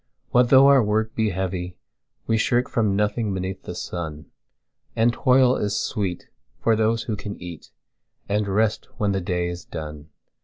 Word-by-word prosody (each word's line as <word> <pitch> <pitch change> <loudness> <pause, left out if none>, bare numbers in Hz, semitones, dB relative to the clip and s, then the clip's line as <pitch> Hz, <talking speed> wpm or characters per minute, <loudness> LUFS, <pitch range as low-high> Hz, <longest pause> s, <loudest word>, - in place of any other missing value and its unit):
What 125 0 +4
though 135 +1 +8
our 140 -1 +7
work 110 +1 0
he 110 -1 +1
heavy, 90 -1 -3 0.5
we 115 - +1
shirkFrom 115 -2 +1
nothing 105 0 0
beneath 95 +1 -4
the 90 - -7
sun; 80 -4 -5 0.7
And 115 +1 +3
toil 130 0 +4
is 105 -1 -1
sweet 95 -5 -3 0.4
to 115 - +4
those 110 +1 +1
who 110 - -3
can 100 0 -6
eatAnd 100 +4 -7
rest 105 +2 0
when 105 -1 +1
the 95 -1 -1
day 90 -1 -1
is 85 0 -6
done. 75 0 -8
105 Hz, 155 wpm, -23 LUFS, 90-115 Hz, 0.7 s, though